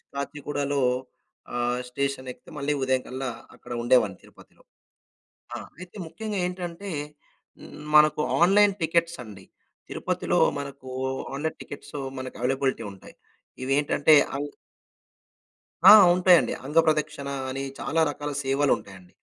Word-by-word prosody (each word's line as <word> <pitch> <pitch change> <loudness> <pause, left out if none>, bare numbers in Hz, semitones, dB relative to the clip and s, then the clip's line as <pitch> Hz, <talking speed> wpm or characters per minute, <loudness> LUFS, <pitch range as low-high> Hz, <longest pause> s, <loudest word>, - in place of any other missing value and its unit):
కాచిగూడలో 145 0 -2 0.7
ఆహ్ 120 +1 0
స్టేషన్ 140 0 -3
ఎక్కితే 165 - -15
మళ్ళీ 145 +1 0
ఉదయం 130 -1 +1
కల్లా 130 0 -4 0.3
అక్కడ - - -14
ఉండేవాడిని 110 -6 +3
తిరుపతిలో. - - -20 0.9
ఆ! - - -3 0.2
అయితే 180 +1 -11
ముఖ్యంగా 210 +4 -5
ఏంటంటే 180 +2 -5 1.1
మనకు 150 0 +6 0.2
ఆన్‌లైన్ 200 +3 +5
టికెట్స్ 170 +1 +1
అండి. 100 -4 -12 0.4
తిరుపతిలో - - -1 0.2
మనకు 140 -2 -8 0.4
ఆన్‌లైన్ 155 +3 -3
టికెట్స్ 145 - -10 0.2
మనకు 130 0 -7
అవైలబిలిటీ 130 -2 0
ఉంటాయి. 95 - -15 0.5
ఇవి 135 - -3
ఏంటంటే 150 +1 +4 0.2
అంగ్ 145 0 -4 1.3
ఆ! - - +11 0.2
ఉంటాయండి. 180 -2 +5
అంగ 150 +4 -4
ప్రదక్షిణ 150 -2 0 0.2
అని 135 +1 -4 0.2
చాలా 165 0 0
రకాల 145 0 -5
సేవలు 135 +1 +1
ఉంటాయండి. 95 -3 -14
140 Hz, 115 wpm, -26 LUFS, 130-160 Hz, 1.3 s, ఆ